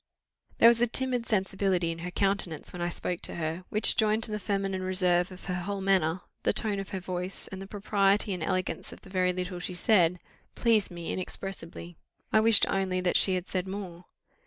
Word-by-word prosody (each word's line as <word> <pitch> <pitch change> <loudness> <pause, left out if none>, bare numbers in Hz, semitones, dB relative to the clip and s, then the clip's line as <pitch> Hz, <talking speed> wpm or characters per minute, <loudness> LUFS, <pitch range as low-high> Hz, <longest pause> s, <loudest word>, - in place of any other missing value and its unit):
There 230 - +7
was 235 0 +5
a 240 - +4
timid 250 0 0
sensibility 190 -4 0
in 165 - -7
her 180 +2 -5
countenance 195 -4 -1
when 175 - -6
I 175 - 0
spoke 175 0 -4
to - - -3
her, 165 +2 -4
which 215 - +7
joined 215 0 +2
to 220 - -1
the 210 - -2
feminine 195 -2 -2
reserve 185 -1 +1
of 185 - -11
her 180 - -3
whole 190 +3 -3
manner, 185 -3 +1 0.2
the - - +1
tone 210 -3 -2
of 195 - -6
her 190 - -4
voice, 180 +1 -5
and 190 0 -8
the 195 - -8
propriety 200 0 +1
and 180 - -5
elegance 185 +3 -2
of - - -12
the 190 - -15
very 185 -1 +2
little 180 0 -4
she 180 0 -5
said, 180 -3 +3 0.4
pleased 225 -4 +2
me 170 -1 -5
inexpressibly. 175 -2 -7 0.4
I 220 - +6
wished 220 -1 +6
only 190 -1 0
that 180 -1 0
she 190 - +5
had 180 0 -4
said 185 0 -2
more. 185 -3 -7
190 Hz, 205 wpm, -28 LUFS, 180-200 Hz, 0.4 s, There